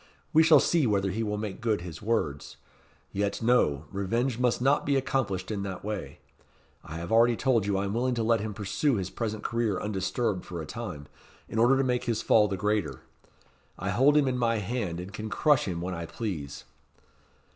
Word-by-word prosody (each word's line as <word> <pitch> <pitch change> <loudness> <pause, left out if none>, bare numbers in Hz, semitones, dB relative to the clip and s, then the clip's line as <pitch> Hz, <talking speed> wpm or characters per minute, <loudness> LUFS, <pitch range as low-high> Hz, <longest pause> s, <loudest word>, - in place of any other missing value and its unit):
"We 160 - +7
shall 155 -2 +7
see 160 -1 +2
whether 100 -2 +1
he 110 +4 -2
will 105 -2 -2
make 105 -2 -5
good 110 -5 0
his 85 -2 -8
words. 90 -10 -2 0.5
Yet 100 0 -1
no! 110 - +2
Revenge 115 +6 -1
must 125 -1 +2
not 135 +4 +3
be 140 - +1
accomplished 115 -8 -1
in 105 -2 -2
that 95 -2 -5
way. 105 -1 -5 0.7
I 80 - -9
have 85 +1 -6
already 115 +1 +5
told 115 -5 +1
you 100 -1 +1
I 100 - -1
am 100 - -3
willing 125 +2 0
to 115 - -1
let 115 0 +3
him 105 0 -4
pursue 115 +7 0
his 95 -3 -3
present 110 -2 -4
career 115 -5 0
undisturbed 105 0 -1
for 85 -2 -7
a 80 - -5
time, 75 -1 -6 0.4
in 110 - -3
order 125 +4 +5
to 135 - +2
make 125 -2 0
his 115 -2 -1
fall 105 -2 +5
the 95 -1 -3
greater. 105 +2 -1 0.8
I - - -2
hold 145 +4 +4
him 145 -2 +3
in 125 -1 -1
my 115 -1 +2
hand, 100 -5 -3
and 90 +3 -8
can 110 +1 -5
crush 145 +3 +3
him 85 -3 -3
when 90 +1 -3
I 85 -1 -5
please." 80 - -5
110 Hz, 205 wpm, -28 LUFS, 95-120 Hz, 0.8 s, We